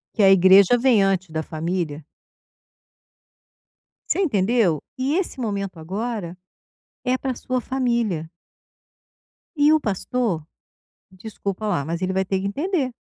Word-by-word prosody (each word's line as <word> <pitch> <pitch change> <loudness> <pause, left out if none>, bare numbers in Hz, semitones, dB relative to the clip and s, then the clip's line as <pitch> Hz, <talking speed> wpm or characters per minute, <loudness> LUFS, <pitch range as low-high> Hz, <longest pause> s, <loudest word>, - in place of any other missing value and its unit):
Que 220 - +1
a 195 - +7
igreja 195 +4 +6
vem 240 -4 +4
antes 190 -3 0
da 160 0 -2
família. 160 -2 -4 2.1
Você - - +1
entendeu, 210 - +2 0.2
e 270 +5 0
esse 355 -7 -2
momento 200 -6 -3
agora 195 0 -4 0.7
é 255 0 +2
para 260 -2 -3
sua 255 +1 -2
família. 235 -11 -1 1.3
E 295 +1 +4
o 310 - +4
pastor, 205 -1 -1 0.7
desculpa 200 +1 -6
lá, 170 -9 0
mas 170 +2 -3
ele 185 0 0
vai 190 0 0
ter 190 0 -1
que 195 - -3
entender. 285 - -1
200 Hz, 130 wpm, -22 LUFS, 180-250 Hz, 2.1 s, a